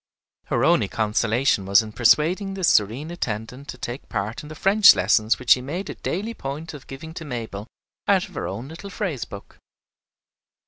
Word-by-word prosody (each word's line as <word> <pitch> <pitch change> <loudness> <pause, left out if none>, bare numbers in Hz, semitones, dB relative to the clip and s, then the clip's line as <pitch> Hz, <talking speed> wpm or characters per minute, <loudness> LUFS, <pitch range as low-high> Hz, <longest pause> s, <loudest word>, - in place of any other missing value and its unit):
Her - - 0
only - - +3
consolation 110 0 +1
was 100 +3 +5
in 110 - -8
persuading 170 - +2
this 190 -3 +2
serene 120 +10 +1
attendant 125 -3 -5
to 130 - -7
take 120 +2 -5
a - - -31
part 105 +3 -3
in 150 - -11
the 155 - -8
French 205 +5 +6
lessons 110 +1 +2
which 125 -2 -2
she 125 - +7
made 170 +9 -5
a - - -6
daily 210 +7 -4
point 155 -2 -6
of 145 -3 -11
giving 160 +4 -9
to 165 - -7
Mabel 115 -6 -6 0.4
out 195 0 +3
of 185 - -17
her - - -4
own 115 +7 -6
little 170 +5 -9
phrase 185 - -3
book. 100 - -12
135 Hz, 190 wpm, -23 LUFS, 110-170 Hz, 0.4 s, she